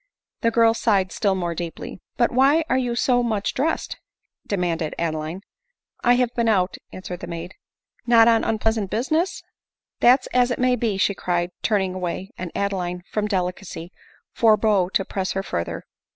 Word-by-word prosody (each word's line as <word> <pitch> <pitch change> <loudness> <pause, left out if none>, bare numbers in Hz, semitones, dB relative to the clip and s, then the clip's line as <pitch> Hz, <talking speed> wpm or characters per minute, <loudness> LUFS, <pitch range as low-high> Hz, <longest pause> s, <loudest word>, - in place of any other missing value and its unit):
The 230 - +3
girl 230 0 +4
sighed 200 -5 +1
still 200 -3 +1
more 175 -2 -2
deeply. 170 +1 -6
" - - -50
But 240 - +2
why 275 +6 +4
are 260 - +3
you 245 -2 -1
so 245 0 +2
much 220 -4 -1
dressed?" 310 +5 -1 0.5
demanded 170 -5 -1
Adeline. 160 +2 -3 0.3
" - - -40
I 245 0 +5
have 245 -1 +1
been 235 -1 +1
out," 190 -3 +1
answered 185 -1 -7
the - - -7
maid. 170 +2 -6 0.3
" - - -68
Not 230 -1 +6
on 230 -1 +4
unpleasant 220 -2 0
business 310 - -1 0.2
?" - - -69
" - - -69
That 255 +2 +5
's - - -8
as 250 0 +4
it 245 - -1
may 255 0 +2
be," 225 -5 -1
she 195 +1 +2
cried, 175 -2 -1
turning 195 -4 +1
away; 185 +1 -4
and 180 -2 -6
Adeline, 180 -3 -2
from 210 -1 -1
delicacy, 180 -3 -3 0.4
forbore 215 -4 +3
to 195 - +1
press 190 -1 -3
her 195 - -2
further. 85 - -4
200 Hz, 185 wpm, -23 LUFS, 180-235 Hz, 0.5 s, Not